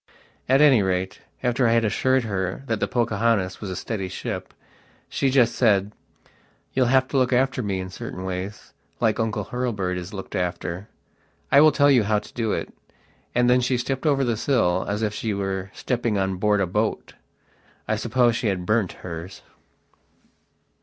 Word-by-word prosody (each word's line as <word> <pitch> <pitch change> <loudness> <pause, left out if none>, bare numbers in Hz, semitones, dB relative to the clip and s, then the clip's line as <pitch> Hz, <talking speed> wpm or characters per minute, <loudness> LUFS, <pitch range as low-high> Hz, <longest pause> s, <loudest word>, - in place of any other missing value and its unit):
At 135 +2 +5
any 135 -7 +6
rate, 95 -1 -2 0.2
after 125 0 +2
I 115 - +3
had 115 -1 +3
assured 130 +4 +2
her 95 0 -3
that 115 -4 -1
the - - 0
"Pocahontas" 110 -4 0
was 100 - -5
a 90 - -4
steady 100 -1 -4
ship, 90 - -5 0.6
she 135 - 0
just 125 -3 +3
said: 105 -4 +2 0.8
"You'll 130 -2 +2
have 130 +1 +3
to 140 - 0
look 130 -1 +2
after 130 +1 +2
me 100 -4 -2
in 95 0 -6
certain 95 0 -7
wayslike 100 +4 -4
Uncle 110 -2 -1
Hurlbird 105 -8 -1
is 90 +1 -6
looked 95 -2 -7
after. 90 +1 -3 0.6
I 140 - +7
will 155 0 +7
tell 145 -1 +4
you 125 -3 +5
how 105 +1 +1
to - - -7
do 115 -3 -1
it." - - -3 0.6
And 125 0 +3
then 125 +1 +4
she 125 +1 +1
stepped 135 +4 -2
over 140 -2 +3
the 120 -3 0
sill, 100 -8 +1
as 105 +2 -1
if 105 -1 0
she 110 -1 -2
were 95 -1 -3
stepping 120 -4 -1
on 95 -1 -1
board 105 +1 +2
a - - +2
boat. 105 +5 -2 0.7
I - - +1
suppose 120 -3 +2
she 115 -1 -1
had 95 -3 -1
burnt 105 -2 +1
hers! 85 +2 -7
110 Hz, 180 wpm, -24 LUFS, 95-125 Hz, 0.8 s, I